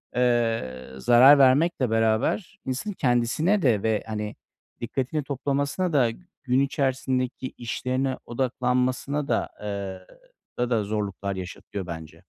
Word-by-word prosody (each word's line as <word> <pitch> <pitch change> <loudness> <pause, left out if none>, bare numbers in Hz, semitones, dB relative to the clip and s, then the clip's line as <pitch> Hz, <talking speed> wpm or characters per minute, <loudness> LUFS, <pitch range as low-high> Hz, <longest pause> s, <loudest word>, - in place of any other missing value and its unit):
eee, 115 - 0
zarar 125 - +7
vermekle 135 0 +4
beraber 115 - 0
insanın 130 +11 -3
kendisine 135 - +2
de 115 -8 +2
ve, 110 -1 +1
hani, 105 -1 -4 0.5
dikkatini 135 +5 -2
toplamasına 145 +5 -1
da 125 -5 +4 0.3
gün 130 0 +2
içerisindeki 130 -2 -1
işlerine 130 +2 -2
odaklanmasına 130 +3 -1
da, 115 - 0
eee, 100 -2 -5 0.5
orada 125 0 0
da - - -1
zorluklar 100 -2 -3
yaşatıyor 95 +1 -6
bence. 80 -2 -8
125 Hz, 110 wpm, -25 LUFS, 110-135 Hz, 0.5 s, zarar